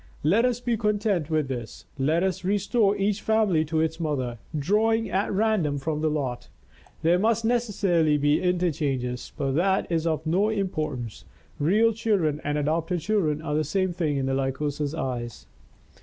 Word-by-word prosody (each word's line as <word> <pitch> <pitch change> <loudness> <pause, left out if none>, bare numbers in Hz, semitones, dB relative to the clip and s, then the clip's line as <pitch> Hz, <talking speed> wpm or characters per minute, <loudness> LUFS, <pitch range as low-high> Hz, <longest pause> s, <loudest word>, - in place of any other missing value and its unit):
Let 200 +11 +4
us 245 -1 0
be 240 -2 -1
content 205 -6 0
with 155 -3 +1
this. 120 -4 -6
Let 155 +6 +2
us 190 -1 -1
restore 205 +2 +2
each 200 +1 0
family 215 -7 +2
to 160 +1 0
its 160 +1 -1
mother, 130 -7 -2 0.2
drawing 220 +8 +1
at 195 +3 0
random 200 -8 +1
from 150 +2 -2
the 155 - +2
lot. 135 -5 -3 0.5
There 170 +2 +4
must 225 +2 +1
necessarily 200 -10 +2
be 145 +1 +2
interchanges, 145 -9 -1
but 135 -1 -1
that 190 +7 +2
is 165 0 0
of 160 -1 -1
no 185 +7 +2
importance, 155 - -3 0.4
real 215 +9 +3
children 195 -9 0
and 145 +1 -1
adopted 165 +4 -1
children 160 -5 0
are 150 - -3
the 155 +1 +1
same 185 +1 0
thing 155 -5 -1
in 135 - -1
the 135 - 0
Lycosa's 140 +2 -2
eyes. 125 -6 -4
165 Hz, 165 wpm, -25 LUFS, 145-205 Hz, 0.5 s, Let